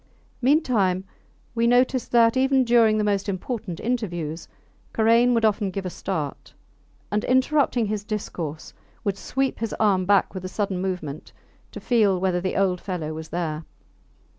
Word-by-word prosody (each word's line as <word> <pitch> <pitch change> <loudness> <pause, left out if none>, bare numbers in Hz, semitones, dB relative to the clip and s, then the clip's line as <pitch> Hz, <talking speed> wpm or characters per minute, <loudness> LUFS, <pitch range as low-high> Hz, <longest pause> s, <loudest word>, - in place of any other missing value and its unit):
Meantime 235 - +2 0.5
we 235 0 +1
noticed 250 +1 +2
that, 230 -1 +5
even 265 0 +3
during 230 -3 +4
the 215 - +1
most 200 0 0
important 195 -2 -4
interviews, 175 -10 -3 0.5
Karain 230 +2 +4
would 230 -1 +2
often 210 -2 +1
give 195 0 -5
a 180 - -3
start, 160 -8 -5 0.6
and 210 +1 0
interrupting 260 -2 +2
his 210 0 -3
discourse, 175 -7 -5 0.3
would 200 -2 0
sweep 270 +5 -2
his 225 -2 -3
arm 195 -4 +3
back 200 -2 +3
with 185 -2 -6
a 185 - -4
sudden 195 -2 -2
movement, 175 -6 -5 0.4
to - - -7
feel 210 -6 +2
whether 180 -1 0
the 185 - -2
old 185 -2 +1
fellow 165 -5 -4
was 160 0 -7
there. 160 -2 -3
205 Hz, 155 wpm, -24 LUFS, 180-235 Hz, 0.6 s, that